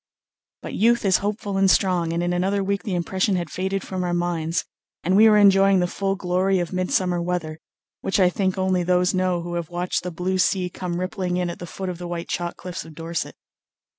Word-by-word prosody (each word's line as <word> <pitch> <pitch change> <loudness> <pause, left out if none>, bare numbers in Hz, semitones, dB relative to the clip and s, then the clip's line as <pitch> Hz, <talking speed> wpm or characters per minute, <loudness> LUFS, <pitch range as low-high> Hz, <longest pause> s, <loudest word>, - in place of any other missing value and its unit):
But - - -6
youth 235 +1 +3
is 190 -2 +4
hopeful 205 -1 -3
and 195 0 +4
strong, 180 -3 +2
and 170 +1 -1
in 175 0 0
another 195 +3 0
week 200 0 -1
the 185 -1 -3
impression 185 +3 0
had 175 -3 -3
faded 190 +1 -2
from 185 -1 -4
our 175 -1 -1
minds, 170 -1 -1 0.4
and 185 +2 +2
we 220 +2 +7
were 210 - +5
enjoying 195 -1 +5
the 180 - +2
full 195 +2 -1
glory 185 +1 +1
of 175 0 -2
midsummer 185 -1 0
weather, 170 -3 -3 0.4
which 195 - -1
I 180 -2 +5
think 190 0 -1
only 185 -1 +1
those 180 +1 +2
know 185 -2 0
who 175 0 -5
have 170 -2 -3
watched 175 +1 -2
the 180 - -4
blue 180 +2 -2
sea 180 -1 +1
come 175 -1 -4
rippling 185 -1 -2
in 180 -1 -1
at - - -10
the 175 - -7
foot 190 +2 -6
of 180 -2 -4
the 175 - -5
white 170 -1 -5
chalk 175 -1 -3
cliffs 180 0 -6
of 160 -1 -13
Dorset. 165 +1 -4
180 Hz, 225 wpm, -23 LUFS, 175-195 Hz, 0.4 s, we